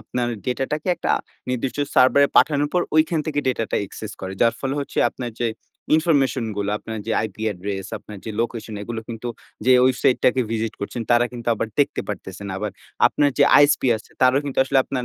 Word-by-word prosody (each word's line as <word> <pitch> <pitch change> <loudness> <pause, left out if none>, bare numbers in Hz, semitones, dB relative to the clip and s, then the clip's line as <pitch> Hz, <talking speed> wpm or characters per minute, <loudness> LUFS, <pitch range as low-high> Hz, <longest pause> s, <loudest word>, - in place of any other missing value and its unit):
আপনার 120 +3 -2 0.2
ডেটাটাকে 135 +6 -2
একটা - - -2 0.4
নির্দিষ্ট 125 +2 -2 0.2
server 130 +2 +6
এ - - -12
পাঠানোর 145 -1 +3
পর 180 - +3
ঐখান 155 +1 +3
থেকে 150 -2 -2
ডেটাটা 115 -3 -1
access 105 +2 -8
করে। 95 0 -5
যার 115 -1 +4
ফলে 135 0 -2
হচ্ছে 140 - -5
আপনার 120 0 -6
যে 120 - +2 0.5
ইনফরমেশনগুলো, 130 - +1
আপনার 110 0 -6
যে 115 - -1
IP 100 - -15
অ্যাড্রেস, 95 -1 -3
আপনার 105 - -11
যে 110 - -4
লোকেশন, 115 -2 -3
এগুলো 115 +2 -5
কিন্তু 115 +1 -5 0.4
যে 130 - +5
website 130 0 +2
টাকে 130 +1 +4
visit 115 0 -1
করছেন, 115 +3 -4
তারা 120 0 +5
কিন্তু 120 -1 -5
আবার 110 - -2
দেখতে 140 - +1
পারতেছে 95 +1 -6
না। - - -4
আবার 105 +1 -3 0.4
আপনার 145 -1 +2
যে 140 - +7 0.2
ISP 145 0 +4
আছে, 110 - -14
তারাও 130 +2 +5
কিন্তু 140 -2 -4
আসলে 135 0 +2
আপনার 125 -2 -3
120 Hz, 190 wpm, -22 LUFS, 110-135 Hz, 0.5 s, যে